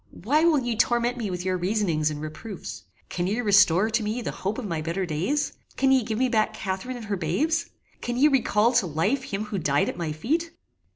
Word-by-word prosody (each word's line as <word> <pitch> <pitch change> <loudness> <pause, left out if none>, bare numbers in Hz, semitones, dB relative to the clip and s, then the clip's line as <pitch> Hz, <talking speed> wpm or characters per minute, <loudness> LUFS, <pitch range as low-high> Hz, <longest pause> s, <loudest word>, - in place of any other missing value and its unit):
Why 295 +9 +3
will 330 -3 +5
ye 240 -3 -1
torment 240 +2 +1
me 220 -4 -3
with 180 0 -4
your 185 -1 +1
reasonings 180 -5 0
and 150 -1 -5
reproofs? 160 +6 -7 0.2
Can 175 0 -2
ye 210 +5 -1
restore 200 -2 +4
to 230 +1 +1
me 220 +3 -2
the - - -2
hope 195 +3 -3
of 255 - -4
my 165 -5 -2
better 170 +4 -2
days? 185 - -1 0.2
Can 270 0 +3
ye 265 -1 +5
give 220 -1 -3
me 255 +2 +2
back 220 -3 +1
Catharine 195 +6 -4
and 230 - -8
her 205 -1 -1
babes? 265 - 0 0.3
Can 240 0 -3
ye 285 +4 +6
recall 235 -5 +3
to 235 -6 +3
life 200 - 0
him 205 -4 -3
who 210 -2 -3
died 145 -3 +1
at - - -6
my 165 -3 -2
feet? 315 - -1
215 Hz, 225 wpm, -25 LUFS, 180-245 Hz, 0.3 s, ye